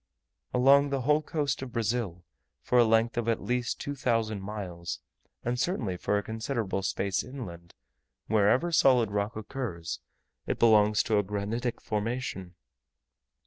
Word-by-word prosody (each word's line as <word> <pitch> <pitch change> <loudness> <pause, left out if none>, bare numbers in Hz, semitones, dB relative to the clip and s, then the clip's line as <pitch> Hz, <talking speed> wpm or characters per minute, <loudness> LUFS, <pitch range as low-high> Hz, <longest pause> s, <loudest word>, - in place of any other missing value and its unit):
Along 140 +3 +5
the 135 -1 -1
whole 150 +4 +3
coast 150 -3 -2
of 130 -3 -7
Brazil, 110 -6 -1 0.4
for 125 - +3
a - - +8
length 115 +1 +2
of 115 -1 0
at 115 - +1
least 125 0 -1
2000 115 -7 -1
miles, 95 -4 -5 0.5
and 120 +1 -1
certainly 125 - -1
for 105 +3 0
a 100 - -1
considerable 110 -3 -2
space 95 +1 -1
inland, 85 -11 -9 0.5
wherever 110 +10 +3
solid 125 -8 +4
rock 105 +1 -1
occurs, 105 - -5 0.5
it - - -1
belongs 105 -2 +5
to 110 -2 +2
a - - +1
granitic 105 +5 -3
formation. 105 -4 -3
115 Hz, 140 wpm, -29 LUFS, 100-125 Hz, 0.5 s, a